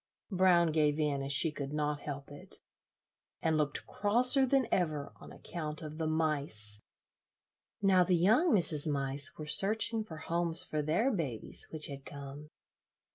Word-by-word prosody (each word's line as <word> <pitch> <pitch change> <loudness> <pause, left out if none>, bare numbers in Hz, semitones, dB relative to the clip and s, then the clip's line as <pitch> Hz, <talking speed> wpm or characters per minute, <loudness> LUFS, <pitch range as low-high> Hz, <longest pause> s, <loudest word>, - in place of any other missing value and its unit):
Brown 180 -3 +3
gave 150 -1 +1
in, 145 -2 -1
as 135 0 -4
she 155 +3 +5
could 140 -1 -6
not 150 -1 -2
help 140 -1 -7
it, 145 - -9 0.8
and 160 -1 0
looked 150 -2 -1
crosser 250 +6 +2
than 270 0 +2
ever 155 -5 -1
on - - -13
account 155 -3 -7
of 155 +1 -8
the 160 - -1
mice. 140 -10 0 1.0
Now 190 -2 +4
the 180 0 +1
young 220 - +3
Mrs. 155 -5 +4
Mice 140 0 0
were 155 - -7
searching 220 +7 +1
for 165 -7 -10
homes 170 +1 -1
for 155 - -3
their 170 - 0
babies, 140 - -2
which 155 -1 -3
had 140 -1 -7
come. 140 +2 -10
155 Hz, 155 wpm, -31 LUFS, 145-180 Hz, 1.0 s, she